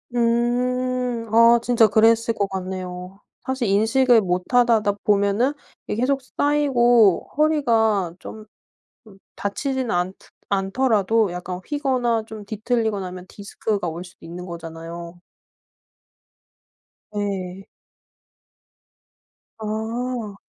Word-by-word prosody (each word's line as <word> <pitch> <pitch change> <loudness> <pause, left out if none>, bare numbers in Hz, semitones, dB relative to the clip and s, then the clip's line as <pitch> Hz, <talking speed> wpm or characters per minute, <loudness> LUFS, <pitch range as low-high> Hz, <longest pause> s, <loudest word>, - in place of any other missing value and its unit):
음. 245 0 0
아 230 +1 +6
진짜 235 -2 +4
그랬을 225 +2 +3
거 200 -2 -1
같네요. 185 0 -6 0.3
사실 260 -4 -1
인식을 225 +4 +4
못 180 -1 -1
하다가 230 -4 +4
보면은 205 +6 +2 0.3
이게 - - -3
계속 270 +1 +1
쌓이고 245 -7 +3
허리가 225 - +2
좀 215 -1 -10 0.6
좀 200 -3 -16 0.2
다치지는 260 +5 -2
않드 180 +2 -2 0.2
않더라도 210 0 +1
약간 180 +1 -6
휘거나 255 -6 0
좀 215 -2 -8
뒤틀리거나 215 -2 -1
하면 180 0 -9
디스크가 205 -1 -3
올 165 +2 -5
수도 175 -2 -15
있는 175 +2 -8
거잖아요. 170 0 -8 2.0
예. 195 -2 -3 1.9
아. 220 0 -4
220 Hz, 215 characters per minute, -22 LUFS, 190-245 Hz, 2.0 s, 아